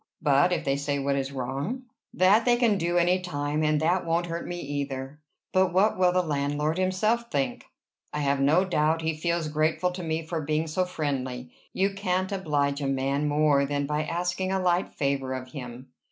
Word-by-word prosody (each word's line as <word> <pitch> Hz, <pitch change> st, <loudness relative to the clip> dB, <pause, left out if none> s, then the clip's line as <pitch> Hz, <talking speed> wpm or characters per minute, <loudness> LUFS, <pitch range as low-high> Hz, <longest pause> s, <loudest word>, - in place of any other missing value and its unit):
"But 150 Hz, +4 st, +3 dB
if 180 Hz, -, -1 dB
they 135 Hz, 0 st, +1 dB
say 140 Hz, 0 st, -1 dB
what 140 Hz, 0 st, 0 dB
is 135 Hz, 0 st, -2 dB
wrong?" 140 Hz, -, -3 dB, 0.3 s
"That 195 Hz, +5 st, +4 dB
they 245 Hz, 0 st, +4 dB
can 230 Hz, -5 st, +2 dB
do 175 Hz, +1 st, 0 dB
any 175 Hz, +2 st, +3 dB
time, 150 Hz, -4 st, -2 dB
and 150 Hz, -1 st, +2 dB
that 175 Hz, +3 st, +2 dB
won't 170 Hz, +1 st, 0 dB
hurt 170 Hz, 0 st, -5 dB
me, 175 Hz, 0 st, -4 dB
either." 140 Hz, -1 st, -4 dB, 0.3 s
"But 185 Hz, -1 st, +3 dB
what 195 Hz, +4 st, +3 dB
will 185 Hz, -1 st, +3 dB
the 180 Hz, 0 st, +2 dB
landlord 150 Hz, +1 st, -1 dB
himself 215 Hz, +6 st, +1 dB
think?" 140 Hz, -2 st, -2 dB, 0.5 s
"I 150 Hz, -, -3 dB
have 140 Hz, -1 st, +1 dB
no 155 Hz, +7 st, +4 dB
doubt 160 Hz, -2 st, +1 dB
he 160 Hz, 0 st, 0 dB
feels 170 Hz, 0 st, -1 dB
grateful 155 Hz, +3 st, +1 dB
to 180 Hz, +1 st, -6 dB
me 160 Hz, -1 st, -2 dB
for 165 Hz, 0 st, -3 dB
being 155 Hz, +2 st, 0 dB
so 170 Hz, +4 st, 0 dB
friendly. 130 Hz, -7 st, -3 dB, 0.2 s
You 195 Hz, +1 st, 0 dB
can't 185 Hz, -1 st, -1 dB
oblige 145 Hz, -7 st, 0 dB
a 140 Hz, -, -1 dB
man 135 Hz, +2 st, 0 dB
more 145 Hz, -1 st, +3 dB
than 145 Hz, 0 st, -1 dB
by 150 Hz, +2 st, -1 dB
asking 175 Hz, +3 st, -2 dB
a 190 Hz, -, +1 dB
light 180 Hz, 0 st, +1 dB
favor 140 Hz, -2 st, -1 dB
of 130 Hz, 0 st, -7 dB
him." 125 Hz, -1 st, -8 dB
155 Hz, 195 wpm, -27 LUFS, 140-180 Hz, 0.5 s, That